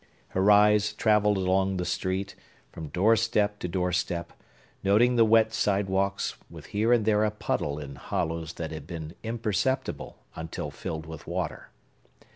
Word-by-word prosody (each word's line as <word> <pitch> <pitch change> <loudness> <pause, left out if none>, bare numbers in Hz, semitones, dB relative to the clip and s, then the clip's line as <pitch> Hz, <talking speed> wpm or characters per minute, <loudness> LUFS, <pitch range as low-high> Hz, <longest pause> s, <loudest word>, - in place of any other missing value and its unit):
Her 95 +2 +2
eyes 105 0 +5
travelled 105 -2 +3
along 95 0 +1
the 90 - -2
street, 95 +2 -2 0.4
from 80 -2 -7
doorstep 105 +3 +2
to - - -3
doorstep, 90 -1 -2 0.5
noting 115 +6 +4
the 115 - +6
wet 110 0 +4
sidewalks, 100 -1 0
with - - -11
here 110 +3 0
and 120 -3 +4
there 105 -1 +3
a 110 - +2
puddle 75 -8 -2
in 70 -2 -8
hollows 80 0 -3
that 80 -2 -5
had 80 -2 -8
been 80 -2 -6
imperceptible 115 +4 -2 0.2
until 80 0 -5
filled 80 -1 -6
with 80 -2 -10
water. 85 -1 -4
95 Hz, 145 wpm, -27 LUFS, 85-105 Hz, 0.5 s, the